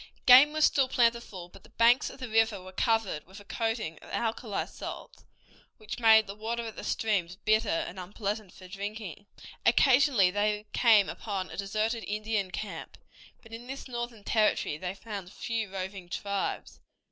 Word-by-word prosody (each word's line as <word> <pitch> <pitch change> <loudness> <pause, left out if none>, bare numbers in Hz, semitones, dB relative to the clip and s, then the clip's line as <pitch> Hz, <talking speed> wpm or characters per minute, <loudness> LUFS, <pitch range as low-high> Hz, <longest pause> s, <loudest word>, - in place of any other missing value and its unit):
Game 260 +4 +9
was 310 0 +3
still 270 -2 +3
plentiful 235 -8 0
but 190 +2 -16
the - - -19
banks 235 +2 +3
of - - -13
the 255 - -5
river 225 -2 +2
were 185 0 -11
covered 225 -6 0
with 190 +3 -12
a 205 - -15
coating 225 -8 -3
of - - -15
alkali 225 -2 -2
salts, - - -9 0.5
which 215 +2 -7
made 220 -2 +6
the 200 - -7
water 230 +3 -4
of 225 - -7
the - - -8
streams 190 -6 -1
bitter 215 +2 +1
and 175 +3 -2
unpleasant 200 +1 -4
for 185 - -13
drinking. 205 0 -7 0.4
Occasionally 255 -8 +4
they 210 +1 0
came 220 -5 +5
upon 195 -4 -5
a - - -7
deserted 215 +4 -1
Indian 210 -2 -2
camp, 210 +3 -7 0.5
but 225 -1 -15
in 235 +2 -8
this 270 +1 -7
northern 240 -3 -6
territory 215 -8 +1
they 180 +4 -5
found 200 -3 -8
few 220 -2 -3
roving 190 -1 -6
tribes. 200 +1 -3
215 Hz, 170 wpm, -29 LUFS, 195-230 Hz, 0.5 s, Game